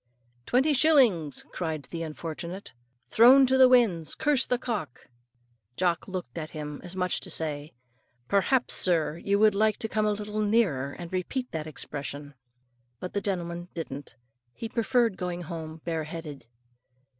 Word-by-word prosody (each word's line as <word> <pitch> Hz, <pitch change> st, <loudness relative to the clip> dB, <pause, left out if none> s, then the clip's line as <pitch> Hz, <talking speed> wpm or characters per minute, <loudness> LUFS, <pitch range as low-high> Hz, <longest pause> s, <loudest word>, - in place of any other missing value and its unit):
"Twenty 265 Hz, +5 st, +3 dB
shillings," 250 Hz, -, +4 dB
cried 160 Hz, -4 st, -3 dB
that 165 Hz, +5 st, -7 dB
unfortunate, 165 Hz, +4 st, -6 dB, 0.4 s
"thrown 260 Hz, +4 st, +8 dB
to 260 Hz, +1 st, +2 dB
the 260 Hz, -1 st, +7 dB
winds! 200 Hz, -, +3 dB
Curse 290 Hz, -3 st, +1 dB
the 250 Hz, -, +1 dB
cock!" 210 Hz, -, -5 dB, 0.7 s
Jock 175 Hz, -3 st, 0 dB
looked 180 Hz, -9 st, -5 dB
at 155 Hz, -1 st, -5 dB
him, 150 Hz, -1 st, -6 dB
as 180 Hz, +1 st, -7 dB
much 180 Hz, -1 st, 0 dB
as -, -, 0 dB
to -, -, -6 dB
say, 150 Hz, -1 st, -3 dB, 0.5 s
"Perhaps, 235 Hz, -, +2 dB
sir, 165 Hz, -3 st, 0 dB
you 200 Hz, +3 st, +1 dB
would 215 Hz, 0 st, +5 dB
like 215 Hz, +1 st, +2 dB
to 220 Hz, -, -3 dB
come 215 Hz, -1 st, 0 dB
a -, -, +2 dB
little 210 Hz, +1 st, -3 dB
nearer, 200 Hz, -, +1 dB
and 175 Hz, +1 st, -9 dB
repeat 250 Hz, +8 st, -2 dB
that 160 Hz, -1 st, -4 dB
expression." 145 Hz, -1 st, -6 dB, 0.7 s
But 180 Hz, -, -6 dB
the 200 Hz, -, -1 dB
gentleman 175 Hz, -3 st, -3 dB
didn't. 140 Hz, -6 st, -6 dB, 0.4 s
He 225 Hz, -, -5 dB
preferred 230 Hz, -2 st, +1 dB
going 180 Hz, -1 st, -4 dB
home 160 Hz, -1 st, -7 dB
bare 160 Hz, -2 st, -2 dB
headed. 150 Hz, -6 st, -8 dB
180 Hz, 155 wpm, -27 LUFS, 160-220 Hz, 0.7 s, thrown